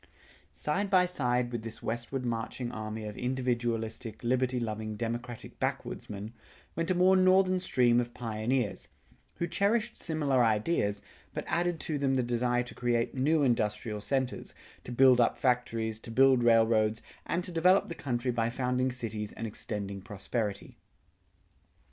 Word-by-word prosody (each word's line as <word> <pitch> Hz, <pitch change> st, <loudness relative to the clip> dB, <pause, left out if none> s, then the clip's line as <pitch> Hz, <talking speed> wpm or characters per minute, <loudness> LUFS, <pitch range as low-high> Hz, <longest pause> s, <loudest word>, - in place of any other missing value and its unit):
Side 150 Hz, -, -1 dB
by 185 Hz, -2 st, +5 dB
side 125 Hz, -8 st, 0 dB
with 120 Hz, -2 st, -3 dB
this 115 Hz, 0 st, -7 dB
westward 120 Hz, +3 st, -3 dB
marching 120 Hz, +1 st, -3 dB
army 110 Hz, -1 st, -5 dB
of 105 Hz, -1 st, -6 dB
individualistic 120 Hz, -3 st, -2 dB
liberty 125 Hz, +1 st, +1 dB
loving 110 Hz, -2 st, -3 dB
democratic 120 Hz, +1 st, -5 dB
backwoodsmen, 105 Hz, +2 st, -4 dB, 0.4 s
went 165 Hz, +2 st, -2 dB
a 185 Hz, -, +2 dB
more 185 Hz, +2 st, +5 dB
northern 185 Hz, 0 st, +4 dB
stream 125 Hz, -9 st, +3 dB
of 120 Hz, 0 st, -2 dB
pioneers, 115 Hz, 0 st, -2 dB, 0.5 s
who 170 Hz, -, -1 dB
cherished 215 Hz, +6 st, 0 dB
similar 145 Hz, -6 st, +1 dB
ideas, 105 Hz, -2 st, +1 dB, 0.3 s
but -, -, -3 dB
added 175 Hz, -1 st, 0 dB
to 150 Hz, -3 st, -2 dB
them 135 Hz, -1 st, +1 dB
the 130 Hz, -, +2 dB
desire 120 Hz, +1 st, +1 dB
to 125 Hz, -, -10 dB
create 120 Hz, -1 st, 0 dB
new 145 Hz, +4 st, +2 dB
industrial 105 Hz, -3 st, 0 dB
centers, 130 Hz, +4 st, -2 dB, 0.3 s
to -, -, -8 dB
build 125 Hz, 0 st, +6 dB
up 120 Hz, -, +2 dB
factories, 115 Hz, -3 st, 0 dB
to 115 Hz, -, -8 dB
build 130 Hz, +1 st, +5 dB
railroads, 110 Hz, -1 st, +3 dB, 0.2 s
and 175 Hz, +1 st, 0 dB
to 180 Hz, -, -4 dB
develop 180 Hz, +3 st, +4 dB
the 170 Hz, -, -6 dB
country 125 Hz, -4 st, -2 dB
by 115 Hz, -1 st, 0 dB
founding 125 Hz, +1 st, 0 dB
cities 110 Hz, -4 st, -4 dB
and 115 Hz, -, -5 dB
extending 100 Hz, -2 st, -5 dB
prosperity. 105 Hz, 0 st, -4 dB
120 Hz, 150 wpm, -30 LUFS, 110-135 Hz, 0.5 s, build